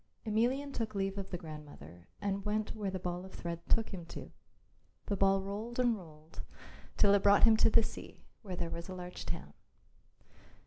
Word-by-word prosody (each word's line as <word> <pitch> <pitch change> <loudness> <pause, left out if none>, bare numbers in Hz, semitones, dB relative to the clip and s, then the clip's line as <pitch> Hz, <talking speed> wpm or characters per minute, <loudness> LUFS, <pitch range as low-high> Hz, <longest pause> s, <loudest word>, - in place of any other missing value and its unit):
Emelian 250 +6 +1
took 220 -4 -3
leave 195 0 0
of 195 -1 -5
the 180 - -3
grandmother 145 - -10
and 200 -1 -1
went 215 +1 -1
where 210 -3 -2
the 190 - -2
ball 180 0 -3
of 190 - -10
thread 170 -1 -4
took 225 -1 +3
him 180 -3 -5
to. 165 - -8 0.7
The 200 - 0
ball 195 0 +4
rolled 210 +5 -4
and 245 -2 +4
rolled 160 -4 -11 0.6
till 200 -1 +6
it 200 - +5
brought 200 0 +6
him 225 -1 +8
to - - +5
the 225 +1 +6
sea, - - -8 0.2
where 190 -5 -5
there 170 -1 -3
was 170 +2 -5
a 185 - -4
large 180 0 -7
town. 70 +4 -4
195 Hz, 190 wpm, -34 LUFS, 175-215 Hz, 0.7 s, him